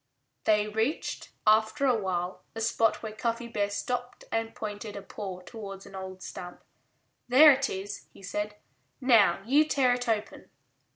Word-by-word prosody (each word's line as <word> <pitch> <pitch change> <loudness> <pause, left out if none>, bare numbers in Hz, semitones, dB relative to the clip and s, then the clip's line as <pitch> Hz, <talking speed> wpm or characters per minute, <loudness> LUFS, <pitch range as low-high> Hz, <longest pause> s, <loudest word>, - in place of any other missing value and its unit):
They 210 -1 +3
reached, 220 +8 -2 0.2
after 220 +6 +4
a 255 -3 +4
while, 185 -3 -2
a 225 - -4
spot 225 0 +2
where 220 -1 -5
Cuffy 230 +2 -2
Bear 205 -3 -1
stopped 245 +4 -3
and 225 0 -1
pointed 210 0 -6
a 200 - -6
paw 190 -3 -6
towards 195 -1 -9
an - - -13
old 190 -1 -7
stump. 180 0 -8 0.6
"There 285 +5 +9
it 275 0 +1
is," 195 +1 -6
he - - -16
said. 210 +2 -3 0.4
"Now 210 -8 +5
you 285 +6 +5
tear 270 -5 +3
it 245 -1 -2
open." 215 -2 -2
215 Hz, 160 wpm, -29 LUFS, 200-245 Hz, 0.6 s, There